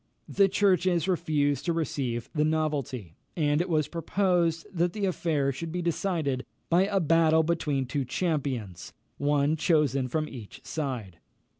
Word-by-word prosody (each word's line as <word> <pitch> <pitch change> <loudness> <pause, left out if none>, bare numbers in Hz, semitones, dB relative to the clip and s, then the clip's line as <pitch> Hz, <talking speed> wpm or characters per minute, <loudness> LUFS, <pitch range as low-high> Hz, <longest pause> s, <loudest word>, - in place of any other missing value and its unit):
The 200 -1 +3
churches 185 -3 +2
refused 150 -6 +1
to 170 - +1
receive 130 -7 -2
the 150 - +2
novelty, 145 - -1 0.2
and 150 -1 +2
it 180 - -3
was 155 -3 +1
proposed 170 0 0
that 175 0 +1
the 210 -2 -1
affair 155 -7 0
should 160 +5 -6
be 180 +1 -3
decided 165 -6 -1 0.3
by 180 +3 +4
a 200 -1 +1
battle 160 -1 +4
between 150 -5 0
two 135 +2 -2
champions, 130 - -3 0.3
one 145 +1 +2
chosen 150 -5 +2
from 155 +4 -1
each 120 -8 -11
side. 125 - -4
155 Hz, 145 wpm, -28 LUFS, 140-170 Hz, 0.3 s, by